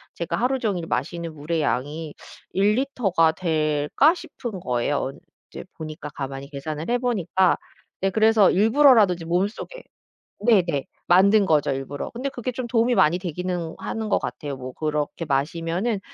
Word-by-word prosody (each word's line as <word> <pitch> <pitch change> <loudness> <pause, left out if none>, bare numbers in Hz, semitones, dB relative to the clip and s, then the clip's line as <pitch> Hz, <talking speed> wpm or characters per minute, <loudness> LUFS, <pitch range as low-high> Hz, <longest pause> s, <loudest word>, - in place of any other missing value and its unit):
'제가 170 - -2
하루 260 +3 +1
종일 195 -8 -1
마시는 170 -1 -3
물의 155 +2 -2
양이 150 +3 -2 0.4
1 200 +2 +3
리터가 215 -11 +2
될까?' 155 - +2
싶은 245 - -7
거예요. 120 -7 -1
어 135 - -3 0.4
이제 - - -8
보니까 155 -1 -7
가만히 135 0 -6
계산을 150 +4 -5
해 245 - +3
보니까. 190 -7 +1 0.4
네 195 0 +1
그래서 220 0 +5
일부러라도 225 -1 +5
좀 165 -2 -9
몸속에 200 - -2 0.6
네네 175 - +3 0.2
만든 200 +3 +5
거죠 150 -4 +2
일부러. 135 +1 -5
근데 255 +4 -4
그게 250 -2 -4
좀 245 +1 -4
도움이 235 +1 +2
많이 170 -4 +4
되기는 175 -1 -4
하는 220 -1 -4
것 - - +3
같아요. 145 -3 -5
뭐 130 0 -7
그렇게 150 +3 -2
마시면은 165 - -1
175 Hz, 325 characters per minute, -24 LUFS, 155-220 Hz, 0.6 s, 그래서